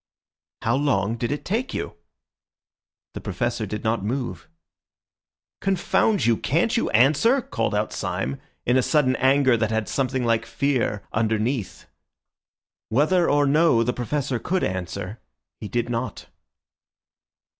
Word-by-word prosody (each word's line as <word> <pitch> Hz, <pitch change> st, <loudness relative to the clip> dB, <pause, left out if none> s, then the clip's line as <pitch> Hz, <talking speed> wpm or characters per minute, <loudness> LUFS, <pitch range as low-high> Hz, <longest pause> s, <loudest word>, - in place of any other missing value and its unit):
"How 115 Hz, +2 st, +2 dB
long 115 Hz, -7 st, +1 dB
did 120 Hz, +2 st, -2 dB
it 145 Hz, -, -4 dB
take 230 Hz, +7 st, -2 dB
you?" -, -, -4 dB, 1.2 s
The -, -, -6 dB
Professor 110 Hz, +3 st, -2 dB
did 105 Hz, +2 st, -5 dB
not 110 Hz, -2 st, 0 dB
move. 120 Hz, -5 st, -3 dB, 1.1 s
"Confound 195 Hz, +2 st, +1 dB
you, 115 Hz, -2 st, +3 dB
can't 170 Hz, -, +1 dB
you 235 Hz, -, +1 dB
answer?" 145 Hz, -, +4 dB
called 115 Hz, -, -2 dB
out 105 Hz, +1 st, -1 dB
Syme, 70 Hz, +2 st, -3 dB, 0.2 s
in 125 Hz, +2 st, +3 dB
a -, -, +4 dB
sudden 130 Hz, -1 st, +2 dB
anger 130 Hz, -1 st, +4 dB
that 110 Hz, -1 st, 0 dB
had 110 Hz, -1 st, -1 dB
something 130 Hz, -2 st, -1 dB
like 115 Hz, 0 st, +1 dB
fear 125 Hz, -7 st, 0 dB
underneath. 110 Hz, +1 st, -1 dB, 1.0 s
Whether 155 Hz, +9 st, +3 dB
or 145 Hz, 0 st, +3 dB
no 145 Hz, -4 st, +4 dB
the 125 Hz, +2 st, 0 dB
Professor 125 Hz, 0 st, -2 dB
could 185 Hz, +10 st, -1 dB
answer, 95 Hz, +3 st, -4 dB, 0.4 s
he 105 Hz, -, -6 dB
did 120 Hz, +2 st, -1 dB
not. 115 Hz, -2 st, -4 dB
120 Hz, 135 wpm, -24 LUFS, 110-145 Hz, 1.2 s, answer